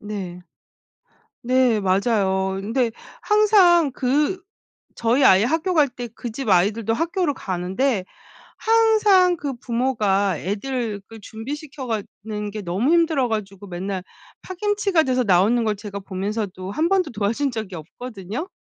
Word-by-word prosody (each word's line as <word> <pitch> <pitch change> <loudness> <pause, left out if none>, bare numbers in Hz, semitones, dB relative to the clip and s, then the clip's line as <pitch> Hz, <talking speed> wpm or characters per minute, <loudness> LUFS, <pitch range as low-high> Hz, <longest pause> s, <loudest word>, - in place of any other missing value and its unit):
네. 195 -4 -6 1.0
네. 250 -2 +2
맞아요. 190 -1 +1
근데 230 +3 0 0.3
항상 390 -7 +4
그 295 +9 0 0.5
저희 240 +4 +2
아이 190 -3 +6
학교 325 +8 0
갈 295 -3 +4
때 245 -1 -7
그 240 - -6
집 250 +2 -5
아이들도 205 +4 +2
학교를 335 +1 0
가는데 190 +3 -1 0.5
항상 430 -5 +4
그 280 -2 -4
부모가 215 -7 0
애들 215 +2 -3
그 225 - -11
준비시켜 275 +6 -7
가는 210 -1 -5
게 215 +1 -6
너무 195 - 0
힘들어 325 -6 +3
가지고 205 -3 -4
맨날 185 +1 -4 0.4
파김치가 395 -2 0
돼서 255 -2 +1
나오는 205 +5 +3
걸 215 -1 0
제가 200 0 -7
보면서도 195 0 -4
1 315 +10 0
번도 370 -5 +2
도와준 225 +6 -1
적이 215 -5 -5
없거든요. 215 - -7
230 Hz, 265 characters per minute, -22 LUFS, 200-295 Hz, 1.0 s, 아이